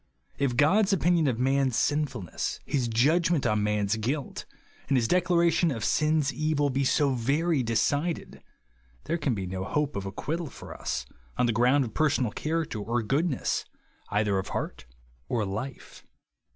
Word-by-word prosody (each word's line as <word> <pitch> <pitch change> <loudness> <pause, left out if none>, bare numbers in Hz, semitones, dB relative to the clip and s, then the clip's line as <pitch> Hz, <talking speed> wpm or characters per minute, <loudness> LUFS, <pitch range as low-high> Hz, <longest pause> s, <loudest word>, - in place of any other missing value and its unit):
If 135 -3 +1
God's 190 +8 +4
opinion 175 -3 +3
of 125 -4 0
man's 135 0 +1
sinful 145 -7 0
ness, 85 - -4
his 130 -4 0
judgment 150 +7 +2
of 105 -2 +2
man's 105 0 0
guilt, 130 +6 -3 0.4
and 135 - +2
his 115 -2 +2
declaration 170 0 +3
of 115 -7 -3
sin's 150 -2 +2
evil 150 -2 0
be 135 +2 0
so 140 +1 +2
very 140 +6 +1
decided, 145 +8 -1 0.6
there 170 +1 -2
can 140 -6 0
be 95 -2 -3
no 95 +1 -4
hope 150 +7 -1
of 100 -1 -3
acquittal 160 - -3
for - - -10
us - - -3 0.3
on - - +3
the 120 - +1
ground 125 +5 +3
of 115 - -8
personal 135 -7 +1
character 155 -6 -2
or 115 +3 -1
good 145 +10 +1
ness, 135 - -1 0.5
either 105 -2 +1
of 95 - -5
heart 65 - -5 0.4
or 115 -4 0
life. 110 +7 -6
135 Hz, 165 wpm, -27 LUFS, 115-155 Hz, 0.6 s, God's